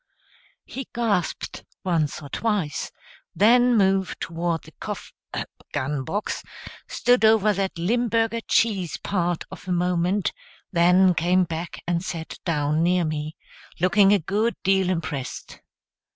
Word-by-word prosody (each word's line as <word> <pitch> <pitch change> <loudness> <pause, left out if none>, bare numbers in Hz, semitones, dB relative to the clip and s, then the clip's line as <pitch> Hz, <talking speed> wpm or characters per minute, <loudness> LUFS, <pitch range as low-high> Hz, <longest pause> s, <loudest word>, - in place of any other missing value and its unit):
He 270 0 -7
gasped 210 -7 -1 0.2
once 160 -5 0
or 140 - -9
twice, 200 -6 -1 0.4
then 240 +3 +5
moved 195 -2 +2
toward 165 -1 -2
the - - -14
cof - - -6 0.6
gun 135 +1 -1
box, 205 +10 -3 0.5
stood 245 -1 +2
over 220 -1 +5
that 195 -2 -2
Limburger 230 +4 +1
cheese 195 -7 +1
part 175 -3 -1
of - - -10
a - - -2
moment, 180 +2 +1 0.4
then 180 +1 +5
came 175 +2 +3
back 165 0 -5
and 170 0 0
sat 165 -3 -6
down 155 -2 +1
near 175 0 +2
me, 155 0 -3 0.4
looking 195 +3 +5
a 205 - +6
good 205 +7 0
deal 190 -1 +3
impressed. 145 -7 -4
180 Hz, 125 wpm, -24 LUFS, 165-205 Hz, 0.6 s, a